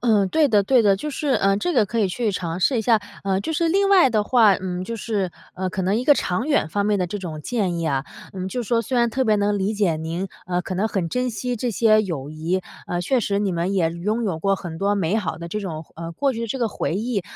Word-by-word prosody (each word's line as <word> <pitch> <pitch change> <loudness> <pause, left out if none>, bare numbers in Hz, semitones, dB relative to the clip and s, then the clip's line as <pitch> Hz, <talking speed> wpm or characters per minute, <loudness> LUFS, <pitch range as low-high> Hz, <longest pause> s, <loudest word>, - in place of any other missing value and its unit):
嗯， 210 -5 +3
对 315 +4 +3
的 210 -5 +3
对 250 +3 +4
的， 200 -2 +5
就 300 +9 -4
是， 290 +1 -3
呃， 195 -5 +3
这 350 +12 -1
个 230 -7 +4
可 220 +3 -3
以 205 - +3
去 215 +4 -1
尝 175 -1 -3
试 250 +5 +3
一 - - 0
下。 225 0 +3 0.2
呃， 190 0 +1
就 320 - -3
是 330 +2 +1
另 395 +3 +2
外 380 -7 +6
的 215 -4 +1
话， 220 -3 +5
嗯， 180 -1 -4
就 230 - -5
是， 205 -5 -2 0.2
呃， 185 0 -2
可 190 +1 -3
能 195 +4 +1
一 245 - -1
个 290 - +6
长 185 +2 -1
远 285 - +2
方 205 +4 -1
面 210 -1 +2
的 180 - 0
这 205 +4 -5
种 160 -5 -6
建 190 -5 -1
议 165 - -2
啊， 135 -1 0 0.3
嗯， 185 -1 -4
就 245 +4 -3
是 210 - -10
说 230 -1 +3
虽 250 +3 -2
然 235 -1 +3
特 260 +3 0
别 215 -2 +3
能 205 0 +1
理 200 +3 0
解 190 -6 +1
您， 165 +4 -4 0.2
呃， 180 0 -1
可 185 - -5
能 200 +4 +1
很 190 -6 -2
珍 250 +6 -1
惜 245 +2 -3
这 245 +2 -2
些 215 0 +4
友 150 -7 -4
谊， 165 +4 -1 0.3
呃， 175 - -2
确 250 +9 +1
实 200 -2 0
你 200 - 0
们 175 +2 -1
也 165 -3 +2
拥 210 +8 -2
有 185 -7 -1
过 195 +4 +2
很 165 -3 -7
多 200 +1 +1
美 195 +1 0
好 180 -6 -2
的 170 0 -7
这 210 - -3
种 165 -5 -5
呃， 165 0 -6
过 275 +10 0
去 230 -1 -3
这 265 - -3
个 235 -3 +1
回 155 -5 -2
忆。 215 -1 -1
200 Hz, 300 characters per minute, -22 LUFS, 180-230 Hz, 0.3 s, 外